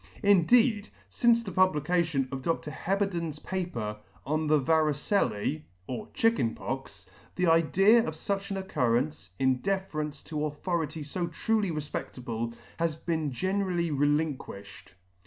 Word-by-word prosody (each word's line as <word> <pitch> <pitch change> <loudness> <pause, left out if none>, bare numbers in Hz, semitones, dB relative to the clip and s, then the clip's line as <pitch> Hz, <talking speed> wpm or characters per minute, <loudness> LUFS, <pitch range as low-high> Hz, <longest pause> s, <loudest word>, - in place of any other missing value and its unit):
In 200 -5 +5
deed, 230 -4 +4 0.2
fince 235 -1 +3
the 195 - -6
publication 165 -5 +2
of 135 -1 -4
Dr. 165 0 -2
Heberden's 175 -4 -1
paper 150 - -4 0.3
on 155 +2 0
the 155 0 +5
Varicellce, 150 - +1 0.2
or 170 - -5
Chicken 225 - +2
Pox, 135 +2 -6 0.3
the 180 - +1
idea 175 +7 +5
of 160 - -3
fuch 195 +4 -3
an 195 - -2
occurrence, 115 - 0
in 130 +2 +2
deference 155 -4 -3
to 150 -1 -3
authority 155 0 -2
fo 170 +4 -3
truly 210 +3 0
refpedtable, 125 -6 -4 0.2
has 165 -2 +1
been 160 -3 -2
generally 185 +2 0
relinquished. 145 -10 -2
160 Hz, 125 wpm, -29 LUFS, 140-190 Hz, 0.3 s, In